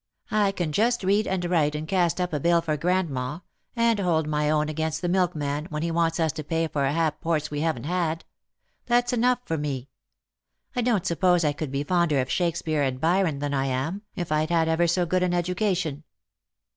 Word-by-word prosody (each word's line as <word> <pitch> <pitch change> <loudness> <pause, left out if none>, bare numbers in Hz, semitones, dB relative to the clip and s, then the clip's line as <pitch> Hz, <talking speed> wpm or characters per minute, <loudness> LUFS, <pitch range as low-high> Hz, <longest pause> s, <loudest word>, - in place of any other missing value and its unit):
I 210 -2 +3
can 175 -5 -2
just 230 +7 +1
read 200 +3 +2
and 185 -2 -1
write 155 -4 +1
and 155 +1 -4
cast 175 -1 +1
up 180 -2 -1
a 150 - 0
bill 170 +3 +3
for 160 -2 -1
grandma, 155 -3 -1 0.3
and 230 -2 +2
hold 165 -5 +1
my 150 0 0
own 150 0 +2
against 160 +2 -2
the - - +1
milkman 160 -5 0
when 155 -2 -4
he 170 - -1
wants 165 0 +1
us 160 -2 +2
to 155 - -6
pay 165 +2 -1
for 140 -3 0
ha'porths 160 0 -1
we 145 - -2
haven't 160 -7 -1
had. 165 0 -1 0.6
That's 245 +1 +2
enough 245 +1 +2
for 160 -1 -2
me. 140 -3 -4 0.9
I 245 - +1
don't 230 -6 +1
suppose 175 0 +2
I 145 - +2
could 145 -1 -5
be 140 +1 -1
fonder 170 -3 +2
of 130 0 -1
Shake 170 -2 +1
speare 155 -3 -1
and 130 -2 -1
Byron 165 -1 +2
than 145 0 -3
I 135 0 0
am, 135 +10 -2
if 175 -5 -4
I'd 155 +1 +1
had 165 -1 +2
ever 165 +1 +2
so 175 +1 +1
good 185 +2 0
an 180 -1 +1
edu 175 +1 0
cation." 175 -7 -1
165 Hz, 210 wpm, -25 LUFS, 150-180 Hz, 0.9 s, I